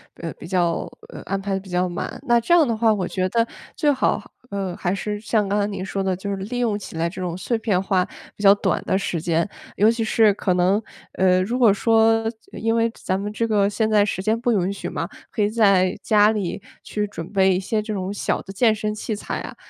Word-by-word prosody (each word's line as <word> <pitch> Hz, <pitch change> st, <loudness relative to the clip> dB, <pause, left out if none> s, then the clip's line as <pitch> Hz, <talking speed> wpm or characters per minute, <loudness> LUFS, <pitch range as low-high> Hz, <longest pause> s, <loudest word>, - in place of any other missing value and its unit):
呃， 165 Hz, -1 st, -6 dB
比 -, -, -9 dB
较 175 Hz, -2 st, 0 dB, 0.2 s
呃， -, -, -9 dB
安 195 Hz, 0 st, -2 dB
排 195 Hz, 0 st, -3 dB
得 195 Hz, -, 0 dB
比 190 Hz, 0 st, -14 dB
较 180 Hz, +1 st, +1 dB
满。 175 Hz, -, -5 dB
那 240 Hz, -1 st, +4 dB
这 235 Hz, -, -5 dB
样 330 Hz, -4 st, +6 dB
的 230 Hz, -, 0 dB
话 220 Hz, 0 st, +3 dB
我 195 Hz, -4 st, 0 dB
觉 185 Hz, -1 st, -1 dB
得 230 Hz, +3 st, +1 dB, 0.3 s
最 295 Hz, -2 st, +2 dB
好， 265 Hz, -, 0 dB, 0.2 s
呃， 195 Hz, -3 st, -3 dB
还 175 Hz, 0 st, -1 dB
是 210 Hz, +1 st, -3 dB
像 215 Hz, -1 st, 0 dB
刚 205 Hz, +2 st, +1 dB
才 200 Hz, -, +1 dB
您 195 Hz, -2 st, -5 dB
说 195 Hz, 0 st, -2 dB
的 190 Hz, -1 st, 0 dB
就 200 Hz, +3 st, -5 dB
是 -, -, -1 dB
利 205 Hz, +6 st, -5 dB
用 230 Hz, -4 st, +1 dB
起 195 Hz, -, -9 dB
来 165 Hz, +1 st, +1 dB
这 175 Hz, +2 st, -7 dB
种 175 Hz, -1 st, -3 dB
碎 225 Hz, +6 st, -1 dB
片 205 Hz, -5 st, +1 dB
化 190 Hz, -2 st, +1 dB, 0.3 s
比 -, -, -11 dB
较 200 Hz, 0 st, +8 dB
短 -, -, 0 dB
的 190 Hz, -, +1 dB
时 180 Hz, -4 st, -2 dB
间， 170 Hz, +1 st, +1 dB, 0.3 s
尤 215 Hz, +3 st, +5 dB
其 230 Hz, 0 st, -2 dB
是 220 Hz, -1 st, +4 dB
可 190 Hz, -2 st, 0 dB
能 185 Hz, +4 st, +2 dB, 0.3 s
呃， 185 Hz, -1 st, +3 dB
如 240 Hz, +6 st, -2 dB
果 235 Hz, -4 st, +6 dB
说 225 Hz, +1 st, +3 dB
就 225 Hz, -1 st, -15 dB
因 225 Hz, +1 st, 0 dB
为 230 Hz, 0 st, +2 dB
咱 185 Hz, +1 st, 0 dB
们 205 Hz, +1 st, -4 dB
这 230 Hz, +2 st, -1 dB
个 205 Hz, -2 st, +2 dB
现 215 Hz, +1 st, 0 dB
在 210 Hz, -1 st, +4 dB
时 195 Hz, -2 st, -2 dB
间 220 Hz, +2 st, +1 dB
不 245 Hz, +1 st, +1 dB
允 195 Hz, -3 st, +1 dB
许 -, -, -5 dB
嘛， -, -, -3 dB, 0.2 s
可 215 Hz, -, -1 dB
以 205 Hz, -, +2 dB
在 195 Hz, -4 st, +3 dB
家 210 Hz, 0 st, +4 dB
里 205 Hz, -5 st, -3 dB, 0.2 s
去 210 Hz, 0 st, -2 dB
准 185 Hz, -3 st, -8 dB
备 190 Hz, -2 st, +3 dB
一 -, -, 0 dB
些 215 Hz, +3 st, -1 dB
这 215 Hz, 0 st, -4 dB
种 190 Hz, -1 st, -3 dB
小 205 Hz, -, -1 dB
的 195 Hz, -, -10 dB
健 220 Hz, +3 st, +3 dB
身 215 Hz, 0 st, -3 dB
器 215 Hz, +1 st, -3 dB
材 205 Hz, -, -4 dB
啊。 -, -, -8 dB
205 Hz, 270 characters per minute, -22 LUFS, 185-220 Hz, 0.3 s, 较